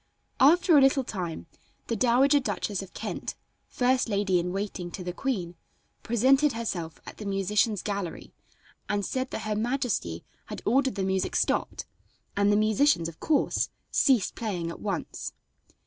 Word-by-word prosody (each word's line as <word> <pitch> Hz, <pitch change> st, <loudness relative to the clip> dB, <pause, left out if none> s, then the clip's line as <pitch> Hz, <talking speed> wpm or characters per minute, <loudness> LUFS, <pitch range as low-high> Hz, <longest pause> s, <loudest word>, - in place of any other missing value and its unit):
After 335 Hz, +5 st, +6 dB
a 285 Hz, -, +8 dB
little 270 Hz, 0 st, +4 dB
time 180 Hz, -9 st, -5 dB, 0.4 s
the 230 Hz, -, -2 dB
Dowager 255 Hz, +5 st, +4 dB
Duchess 205 Hz, -4 st, -2 dB
of 195 Hz, -, -11 dB
Kent, -, -, -4 dB, 0.3 s
first 255 Hz, -1 st, +1 dB
lady 200 Hz, -3 st, +2 dB
in 175 Hz, +1 st, -2 dB
waiting 195 Hz, -2 st, -4 dB
to 180 Hz, +2 st, -7 dB
the 180 Hz, 0 st, -4 dB
queen, 185 Hz, -9 st, -2 dB, 0.5 s
presented 265 Hz, +5 st, +3 dB
herself 175 Hz, -8 st, -4 dB
at -, -, -10 dB
the 215 Hz, -, -7 dB
musicians' 205 Hz, +2 st, +1 dB
gallery 200 Hz, -5 st, -4 dB, 0.6 s
and 205 Hz, -1 st, 0 dB
said 260 Hz, 0 st, -2 dB
that -, -, -5 dB
her 215 Hz, -1 st, -1 dB
majesty 230 Hz, -, -1 dB, 0.2 s
had -, -, -7 dB
ordered 265 Hz, +3 st, +2 dB
the 195 Hz, -, -1 dB
music 190 Hz, 0 st, -1 dB
stopped, -, -, 0 dB, 0.5 s
and 200 Hz, 0 st, +3 dB
the -, -, +4 dB
musicians, 215 Hz, -, +3 dB
of 165 Hz, -, -14 dB
course, 305 Hz, -3 st, +1 dB, 0.2 s
ceased 255 Hz, -9 st, +3 dB
playing 180 Hz, -7 st, -3 dB
at -, -, -9 dB
once. 205 Hz, -, -4 dB
210 Hz, 155 wpm, -27 LUFS, 190-255 Hz, 0.6 s, a